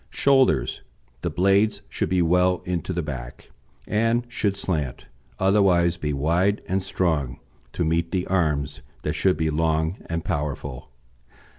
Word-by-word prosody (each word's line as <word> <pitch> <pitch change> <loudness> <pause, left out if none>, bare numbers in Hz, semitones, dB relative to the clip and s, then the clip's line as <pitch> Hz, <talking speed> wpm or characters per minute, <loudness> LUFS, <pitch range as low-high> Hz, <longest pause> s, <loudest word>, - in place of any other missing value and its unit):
SHOULDERS 135 -2 +2 0.4
The - - -1
blades 100 +3 +2
should - - -2
be 90 -1 +2
well 90 +2 +2
into 90 0 -2
the 85 -2 -2
back, 65 -5 -7 0.4
and 115 +3 +1
should 100 -4 -1
slant, 75 -10 -3 0.3
otherwise 95 -3 +3
be 75 -4 -2
wide 85 +8 +1
and 95 +1 0
strong, 80 -9 -1 0.3
to 85 - -1
meet 85 +1 +1
the 90 -1 -1
arms, 75 -5 0 0.2
that - - -1
should 95 -1 +2
be 80 -1 0
long 80 +3 0
and 85 -1 -3
powerful. 70 -3 -3
85 Hz, 140 wpm, -24 LUFS, 75-95 Hz, 0.4 s, otherwise